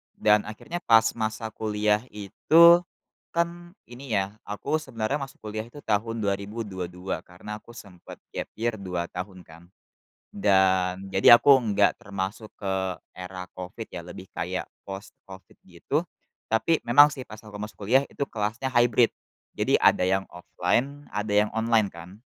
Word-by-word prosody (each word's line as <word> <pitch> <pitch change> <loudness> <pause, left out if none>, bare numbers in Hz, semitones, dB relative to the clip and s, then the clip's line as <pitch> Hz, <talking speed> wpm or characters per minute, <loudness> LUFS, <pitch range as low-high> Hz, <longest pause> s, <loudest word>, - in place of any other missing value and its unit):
Dan 105 0 +3
akhirnya 155 +11 -6
pas 115 -5 +4
masa 110 0 -3
kuliah 105 -1 0
itu, 165 - +5 0.6
kan 175 +1 -2
ini 120 -1 -6
ya, 100 +2 -2
aku 105 +9 -2
sebenarnya 130 0 -3
masuk 135 -4 -9
kuliah 110 +1 -5
itu 145 +4 -13
tahun 110 +1 -1
2022 95 -3 -4
karena 90 +5 -9
aku 120 - -16
sempet 95 -6 -12 0.2
gap - - -4
year 115 -1 -2
2 90 -2 -4
tahun 90 0 -7
kan. 85 +2 -16 0.6
Dan, 95 -1 +2
jadi 95 +5 +8
aku 135 +2 +6
enggak 105 -3 +2
termasuk 100 +2 -5
ke 95 -1 -3 0.4
era 90 0 -7
COVID 90 +5 -8
ya, 85 - -6
lebih 90 +2 -10
kayak 90 +2 -3 0.2
post 95 +1 -7 0.2
COVID 95 0 -13
gitu - - -2 0.4
tapi 110 +9 +2
memang 145 +5 +6
sih 130 - -7
pas 105 - -9
aku 105 -1 -9
masuk 105 0 -7
kuliah 130 +5 +5
itu 140 - -3
kelasnya 115 +4 -3
hybrid, 120 -1 +4 0.4
jadi - - +2
ada - - +4
yang 95 +1 +1
offline, 135 +10 -2
ada 105 0 -2 0.2
yang - - -9
online 110 -3 +1
kan. 85 +4 -12
105 Hz, 150 wpm, -26 LUFS, 95-120 Hz, 0.6 s, jadi